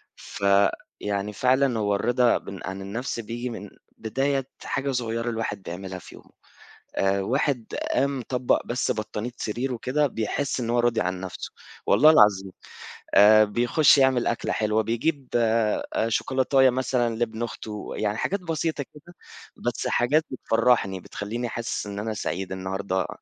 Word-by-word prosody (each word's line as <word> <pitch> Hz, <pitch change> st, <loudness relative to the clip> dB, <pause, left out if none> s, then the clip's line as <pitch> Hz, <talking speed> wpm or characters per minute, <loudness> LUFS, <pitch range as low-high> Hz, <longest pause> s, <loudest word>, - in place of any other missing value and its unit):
فيعني 100 Hz, +1 st, -1 dB
فعلًا 130 Hz, +1 st, +2 dB
هو 105 Hz, -1 st, +1 dB
الرِضا 120 Hz, +3 st, +3 dB
ب 100 Hz, -1 st, -9 dB
عن 95 Hz, +1 st, -5 dB
النَفْس 115 Hz, +6 st, -4 dB
بييجي 120 Hz, +2 st, -4 dB
من 105 Hz, -3 st, -7 dB, 0.3 s
بداية 135 Hz, +4 st, -1 dB, 0.2 s
حاجة 140 Hz, 0 st, -2 dB
صغيّرة 115 Hz, -2 st, -2 dB
الواحد 110 Hz, -3 st, -3 dB
بيعملها 95 Hz, +2 st, -6 dB
في -, -, -13 dB
يومُه. -, -, -17 dB, 0.7 s
آآ، 95 Hz, 0 st, +1 dB
واحد 130 Hz, +2 st, 0 dB, 0.3 s
قام 140 Hz, -1 st, +1 dB
طبَّق 125 Hz, -1 st, +1 dB
بس 125 Hz, +1 st, 0 dB
بطانية 110 Hz, +1 st, -4 dB
سريرُه 120 Hz, +3 st, -3 dB
كده 145 Hz, +3 st, +1 dB
بيحس 130 Hz, +4 st, -2 dB
إن 115 Hz, -2 st, -3 dB
هو 120 Hz, +1 st, +2 dB
راضي 120 Hz, -1 st, +2 dB
عن 90 Hz, 0 st, -2 dB
نَفْسُه، 95 Hz, -1 st, -7 dB, 0.3 s
والله 155 Hz, -, +6 dB
العظيم 105 Hz, -9 st, +5 dB, 0.6 s
آآ، 110 Hz, +1 st, +8 dB
بيخُشّ 120 Hz, +8 st, +4 dB
يعمل 130 Hz, -3 st, +3 dB
أكلة 120 Hz, -, -1 dB
حلوة 110 Hz, 0 st, +1 dB
بيجيب 130 Hz, +5 st, -1 dB
آآ، 115 Hz, -1 st, +1 dB
شوكولاتية 130 Hz, +3 st, +3 dB
مثلًا 125 Hz, -2 st, 0 dB
لابن 115 Hz, 0 st, -2 dB
أختُه 110 Hz, -2 st, -6 dB
يعني 105 Hz, 0 st, -1 dB
حاجات 200 Hz, -, -1 dB
بسيطة 165 Hz, -3 st, -2 dB
كده، 155 Hz, +5 st, -17 dB, 0.5 s
بس -, -, -1 dB
حاجات 150 Hz, +6 st, +2 dB
بتفرّحني 115 Hz, -6 st, +1 dB
بتخلّيني 115 Hz, +6 st, -5 dB
حاسس 115 Hz, -2 st, -3 dB
إن 100 Hz, 0 st, -5 dB
أنا 110 Hz, +1 st, -3 dB
سعيد 95 Hz, -2 st, -4 dB
النهارده 95 Hz, 0 st, -2 dB
115 Hz, 145 wpm, -25 LUFS, 105-130 Hz, 0.7 s, آآ